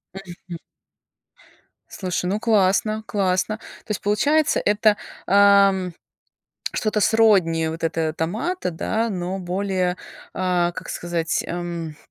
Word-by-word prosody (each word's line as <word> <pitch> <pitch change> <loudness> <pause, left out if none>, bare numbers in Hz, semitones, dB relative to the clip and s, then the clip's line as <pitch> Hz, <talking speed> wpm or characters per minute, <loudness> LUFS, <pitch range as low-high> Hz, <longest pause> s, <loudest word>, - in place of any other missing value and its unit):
Мгм. 175 -2 -9 1.3
Слушай, 180 -2 -3
ну, 200 +4 0
классно, 215 0 +2
классно. 195 +1 0
То 215 - -12
есть - - -2
получается, 290 +10 +2
это, 210 0 +3 0.3
а, 200 0 +6
м, 185 -2 -3 0.8
что-то 215 -1 0
сродни 190 -8 +3
вот 165 +1 -5
этого 160 -1 0
томата, 215 - -2
да, 220 +7 -1
но 185 0 -3
более, 185 0 -1 0.4
а, 180 -2 +1
как - - -8
сказать, 170 -2 -2
эм, 170 -3 -5
185 Hz, 115 wpm, -22 LUFS, 175-210 Hz, 1.3 s, а